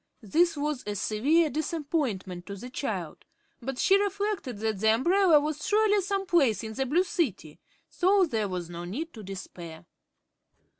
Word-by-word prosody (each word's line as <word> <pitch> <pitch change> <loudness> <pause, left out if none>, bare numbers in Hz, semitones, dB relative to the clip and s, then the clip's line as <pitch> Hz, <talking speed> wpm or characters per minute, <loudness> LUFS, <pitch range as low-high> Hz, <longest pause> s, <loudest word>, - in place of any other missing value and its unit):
This 330 - +2
was 295 -2 -2
a 205 - -2
severe 285 - +2
disappointment 280 - -2
to 200 - -5
the 245 +6 -9
child, 190 - -4 0.4
but 260 +2 -4
she 390 +8 +4
reflected 405 - -2
that 215 -1 -2
the 220 +1 +4
umbrella 345 - +4
was 300 0 -3
surely 420 -1 +3
some 390 +1 -2
place 275 - +2
in 220 0 -5
the 265 +3 -2
Blue 335 +8 +3
City, 285 - -2 0.3
so 385 +1 +3
there 220 - -1
was 180 -2 -4
no 170 0 -7
need 285 - -5
to 220 - -9
despair. 175 -4 -9
270 Hz, 160 wpm, -28 LUFS, -, 0.4 s, she